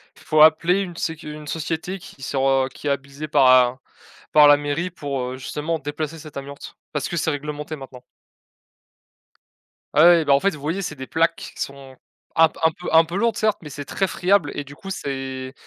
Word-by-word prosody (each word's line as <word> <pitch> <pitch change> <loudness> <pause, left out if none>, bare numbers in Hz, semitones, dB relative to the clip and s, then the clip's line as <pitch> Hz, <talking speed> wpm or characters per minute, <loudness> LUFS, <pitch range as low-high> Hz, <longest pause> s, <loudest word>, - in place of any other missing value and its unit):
Il - - -19
faut 155 -1 +3
appeler 165 +4 +5
une 175 -3 -6
sécu 160 -3 -4
une 150 0 -10
société 165 +4 -3
qui 155 -5 -14
sera 135 0 +1
qui 150 - -7
est - - +2
habilitée 140 +2 -4
par 135 -3 +4 0.2
un 125 +2 -8 0.5
par 150 -1 +8
la 145 - +8
mairie 145 +5 -2
pour, 145 -6 -4
heu, 130 - -6
justement 155 +5 -3
déplacer 150 +2 -5
cette 155 -2 -12
amiante. 140 +1 -8 0.2
Parce 145 -2 -2
que 175 - -4
c'est 160 0 0
réglementé 150 +1 -5
maintenant. 130 -3 -11 1.9
Ah 155 - +5
ouais, 170 -2 +6
ben 140 - +4
en 140 - +5
fait 195 +3 +1
vous 145 - -12
voyez 165 +7 -2
c'est 160 - -5
des 130 -1 -8
plaques 165 +1 +1
qui - - -9
qu - - -9
sont, 135 -1 -7 0.4
un 160 -1 +7
p - - -16
un 160 - +5
peu 175 +3 -7
un 160 0 +6
peu 170 +3 -7
lourdes 230 +1 +1
certes 215 -1 +1
mais 150 - -9
c'est 145 0 -7
très 195 - -1
friable 185 -4 +1
et 145 - -4
du 145 - -12
coup 195 - -10
c'est 135 -5 -5
150 Hz, 220 wpm, -22 LUFS, 140-165 Hz, 1.9 s, par